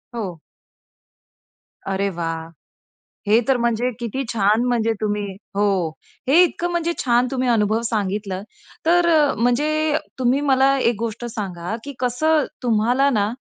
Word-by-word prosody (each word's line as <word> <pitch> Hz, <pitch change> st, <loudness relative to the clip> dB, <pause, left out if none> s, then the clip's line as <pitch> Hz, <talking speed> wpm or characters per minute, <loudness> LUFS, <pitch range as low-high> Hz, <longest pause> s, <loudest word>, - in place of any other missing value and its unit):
हो. 185 Hz, -8 st, -5 dB, 1.5 s
अरे 195 Hz, +1 st, 0 dB
वाह! 165 Hz, -2 st, -4 dB, 0.8 s
हे 220 Hz, +3 st, +5 dB
तर 270 Hz, -2 st, +3 dB
म्हणजे 235 Hz, +1 st, 0 dB
किती 240 Hz, +3 st, -3 dB
छान. 215 Hz, +2 st, +2 dB
म्हणजे 230 Hz, -2 st, +1 dB
तुम्ही 210 Hz, -1 st, -1 dB, 0.3 s
हो, 205 Hz, -, +2 dB, 0.6 s
हे 315 Hz, +6 st, +6 dB
इतकं 350 Hz, 0 st, -1 dB
म्हणजे 340 Hz, 0 st, 0 dB
छान 245 Hz, -1 st, +3 dB
तुम्ही 255 Hz, -1 st, -1 dB
अनुभव 220 Hz, 0 st, +2 dB
सांगितल. 205 Hz, -2 st, -2 dB, 0.5 s
तर 345 Hz, +1 st, +4 dB
अ, 300 Hz, -4 st, +4 dB
म्हणजे 300 Hz, +6 st, +1 dB
अ, 305 Hz, -, +2 dB, 0.2 s
तुम्ही 255 Hz, +3 st, +2 dB
मला 270 Hz, +1 st, +4 dB
एक 240 Hz, -2 st, +2 dB
गोष्ट 230 Hz, +1 st, -4 dB
सांगा, 200 Hz, -5 st, -4 dB
की 280 Hz, -, -7 dB
कसं 290 Hz, +5 st, +1 dB, 0.2 s
तुम्हाला 245 Hz, +4 st, +2 dB
ना 210 Hz, -6 st, +1 dB
235 Hz, 140 wpm, -21 LUFS, 210-275 Hz, 1.5 s, हे